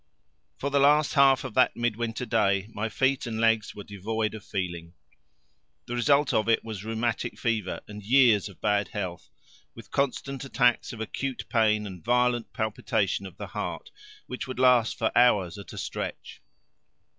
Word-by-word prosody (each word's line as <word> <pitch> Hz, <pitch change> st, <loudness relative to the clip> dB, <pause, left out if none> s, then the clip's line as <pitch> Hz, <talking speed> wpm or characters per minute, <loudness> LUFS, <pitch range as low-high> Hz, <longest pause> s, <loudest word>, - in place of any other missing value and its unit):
For 140 Hz, -, -3 dB
the 140 Hz, -, +3 dB
last 145 Hz, +2 st, +4 dB
half 135 Hz, -3 st, +5 dB
of -, -, -6 dB
that 130 Hz, -, +3 dB
midwinter 120 Hz, 0 st, -2 dB
day 100 Hz, -4 st, +1 dB
my 110 Hz, +2 st, -2 dB
feet 130 Hz, +3 st, 0 dB
and 110 Hz, -1 st, -4 dB
legs 115 Hz, -2 st, +2 dB
were 105 Hz, -, -8 dB
devoid 105 Hz, +2 st, -3 dB
of 110 Hz, -2 st, -8 dB
feeling. 85 Hz, -3 st, -5 dB, 0.9 s
The 120 Hz, -, -6 dB
result 140 Hz, +4 st, +3 dB
of 110 Hz, +1 st, +1 dB
it 115 Hz, -, +3 dB
was 110 Hz, -3 st, -6 dB
rheumatic 115 Hz, +2 st, -2 dB
fever 110 Hz, -5 st, -2 dB
and 105 Hz, 0 st, -9 dB
years 115 Hz, -2 st, +4 dB
of 100 Hz, -, -16 dB
bad 105 Hz, -2 st, +1 dB
health, 90 Hz, -4 st, -6 dB, 0.5 s
with -, -, -13 dB
constant 140 Hz, 0 st, -2 dB
attacks 125 Hz, -3 st, +1 dB
of 115 Hz, -3 st, -8 dB
acute 130 Hz, +4 st, -4 dB
pain 110 Hz, -2 st, +2 dB
and 90 Hz, -5 st, -9 dB
violent 125 Hz, +1 st, +1 dB
palpitation 105 Hz, -3 st, -1 dB
of 95 Hz, -, -14 dB
the -, -, -6 dB
heart -, -, -5 dB, 0.3 s
which 125 Hz, -, -6 dB
would 130 Hz, -, -6 dB
last 125 Hz, -3 st, +4 dB
for 110 Hz, -, -1 dB
hours 105 Hz, -6 st, +3 dB
at 100 Hz, -, -10 dB
a -, -, -10 dB
stretch. -, -, -6 dB
115 Hz, 170 wpm, -27 LUFS, 105-125 Hz, 0.9 s, half